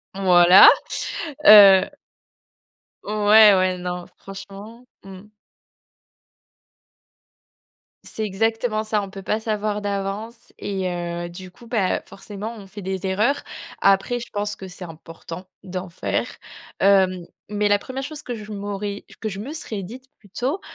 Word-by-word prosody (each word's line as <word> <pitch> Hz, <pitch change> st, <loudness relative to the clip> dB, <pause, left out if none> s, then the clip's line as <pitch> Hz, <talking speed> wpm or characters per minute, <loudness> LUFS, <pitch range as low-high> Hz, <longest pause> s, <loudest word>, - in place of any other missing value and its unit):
Voilà, 180 Hz, -1 st, +7 dB, 0.8 s
heu 195 Hz, -3 st, +9 dB, 1.2 s
Ouais, 210 Hz, 0 st, +6 dB
ouais, 185 Hz, -1 st, +1 dB
non, 180 Hz, 0 st, -5 dB
franchement. 200 Hz, +5 st, -11 dB, 0.2 s
Mmh. 190 Hz, -1 st, -11 dB, 2.8 s
C'est 220 Hz, -, -5 dB
exactement 220 Hz, +2 st, -1 dB
ça. 215 Hz, -1 st, -1 dB
On 200 Hz, -1 st, -7 dB
peut 195 Hz, 0 st, -9 dB
pas 210 Hz, +3 st, -1 dB
savoir 215 Hz, -1 st, -2 dB
d'avance 205 Hz, +3 st, -5 dB
et 190 Hz, -2 st, -3 dB
heu, 175 Hz, 0 st, -4 dB
du 180 Hz, +1 st, -11 dB
coup, 235 Hz, +5 st, -17 dB
bah, 215 Hz, -6 st, 0 dB
forcément, 205 Hz, +3 st, -8 dB
on 200 Hz, -, -12 dB
fait 205 Hz, +1 st, -10 dB
des 190 Hz, 0 st, -4 dB
erreurs. 215 Hz, +10 st, 0 dB, 0.4 s
Après, 195 Hz, +5 st, +2 dB
je 240 Hz, -, -8 dB
pense 205 Hz, 0 st, -3 dB
que 190 Hz, -, -9 dB
c'est 185 Hz, 0 st, -10 dB
important 165 Hz, +2 st, -10 dB, 0.2 s
d'en 185 Hz, -1 st, -6 dB
faire. 170 Hz, -, -3 dB, 0.6 s
Heu, 195 Hz, -1 st, +5 dB, 0.4 s
mais 210 Hz, 0 st, 0 dB
la 205 Hz, 0 st, +3 dB
première 260 Hz, +5 st, -7 dB
chose 290 Hz, +2 st, -8 dB
que 245 Hz, -, -5 dB
je 215 Hz, -1 st, -10 dB
m'aurais 205 Hz, 0 st, -5 dB, 0.2 s
que 220 Hz, -, -3 dB
je 195 Hz, -2 st, -7 dB
me 240 Hz, +9 st, -6 dB
serais 215 Hz, -, -6 dB
dite 255 Hz, +7 st, -11 dB
plutôt, 245 Hz, -, -4 dB
200 Hz, 135 wpm, -22 LUFS, 190-215 Hz, 2.8 s, heu